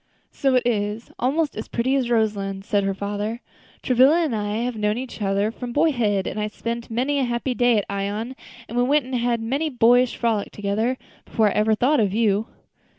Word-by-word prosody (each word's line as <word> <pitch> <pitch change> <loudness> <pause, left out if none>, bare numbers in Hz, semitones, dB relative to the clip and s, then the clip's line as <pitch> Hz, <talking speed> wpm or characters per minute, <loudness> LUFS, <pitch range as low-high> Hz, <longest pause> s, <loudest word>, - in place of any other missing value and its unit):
"So 270 -2 +1
it 250 - +2
is 215 -1 -1
almost 290 +4 0
as 215 - -5
pretty 245 +3 0
as 255 -3 0
Roselands," 200 -4 0
said 205 -2 +1
her 195 - 0
father. 205 +3 -3 0.4
"Travilla 265 +7 +5
and 285 -8 -1
I 205 0 -2
have 245 -1 -2
known 210 0 0
each 250 -3 -7
other 200 +2 +1
from 245 +1 -7
boyhood, 240 - +2
and - - -4
I 210 - -1
spent 230 +2 -5
many 260 +5 0
a - - +2
happy 240 +1 -1
day 245 -2 +3
at 205 - 0
Ion, 205 +5 -3 0.3
and 245 +3 0
we 265 -3 +1
had 235 -1 0
many 275 +8 -1
a - - -2
boyish 245 -1 +4
frolic 225 -4 -1
together, 215 +5 -1 0.3
before 220 -2 +1
I - - -3
ever 215 +1 +2
thought 265 +6 +2
of 205 -2 +1
you." 215 -1 +2
230 Hz, 200 wpm, -23 LUFS, 210-250 Hz, 0.4 s, Travilla